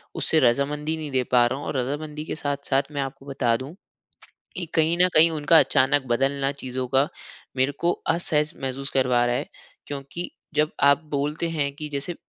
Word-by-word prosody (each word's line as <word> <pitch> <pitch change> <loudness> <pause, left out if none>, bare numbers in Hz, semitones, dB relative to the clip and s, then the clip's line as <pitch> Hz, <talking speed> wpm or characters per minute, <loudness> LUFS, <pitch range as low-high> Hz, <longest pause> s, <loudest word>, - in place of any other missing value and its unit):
उससे 160 - +2
रज़ामंदी 145 +5 +1
नहीं 155 -2 -5
दे 130 -1 +1
पा 120 -1 +6
रहा 130 +3 -1
हूँ। - - -7
और 140 - -2
रज़ामंदी 150 +4 -3
के - - -4
साथ-साथ 140 -2 0
मैं 145 -1 -2
आपको 135 0 -6
बता 130 -4 +1
दूँ 135 +7 -8 0.8
कि, 180 -2 -1
कहीं 160 +1 +3
न 180 - +5
कहीं 160 +2 +7
उनका 155 +1 +4
अचानक 135 0 +3
बदलना 135 +3 +1
चीज़ों 130 0 -3
का 135 +3 +2 0.5
मेरे 130 +2 +2
को 175 +1 +2 0.2
असहज 160 -2 +1
महसूस 135 +1 -4
करवा 125 -2 +2
रहा 120 - +1
है। - - -3 0.4
क्योंकि 145 +5 -6 0.2
जब 150 +1 +2
आप 140 +3 +5
बोलते 150 +4 -1
है 150 -4 -1
कि 150 - -4
जैसे 140 +5 -3
140 Hz, 185 wpm, -24 LUFS, 130-155 Hz, 0.8 s, कहीं